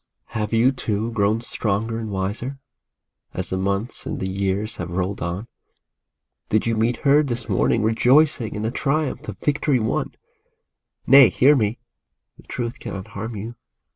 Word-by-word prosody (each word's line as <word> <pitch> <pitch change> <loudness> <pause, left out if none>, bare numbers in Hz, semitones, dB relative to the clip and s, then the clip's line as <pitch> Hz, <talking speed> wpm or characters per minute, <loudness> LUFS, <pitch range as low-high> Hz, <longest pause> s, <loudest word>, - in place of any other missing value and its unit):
Have 105 -2 -2
you, 115 +3 +4
too, 115 -3 -2
grown 110 0 +1
stronger 115 0 -2
and 110 -1 -5
wiser, 105 +8 -3 0.8
as 90 - -3
the - - 0
months 100 +4 -2
and - - -3
the 95 - -2
years 100 +3 -2
have - - -5
rolled 95 +3 -2
on? 90 +6 -3 1.0
Did 110 - +2
you 115 -1 +1
meet 115 +2 +1
her 140 +2 +6
this 120 -5 -3
morning 115 - +2
rejoicing 125 +2 +3
in 105 - -3
the 110 - -1
triumph 145 +1 -1
of - - -6
victory 145 -2 +1
won? 110 -1 -2 0.9
Nay, 135 -2 +8
hear 145 +4 +5
me! 110 -2 0 0.6
The - - -17
truth 120 -1 -4
cannot 95 -1 -6
harm 110 +3 -6
you. 110 +4 -6
115 Hz, 160 wpm, -22 LUFS, 100-125 Hz, 1.0 s, Nay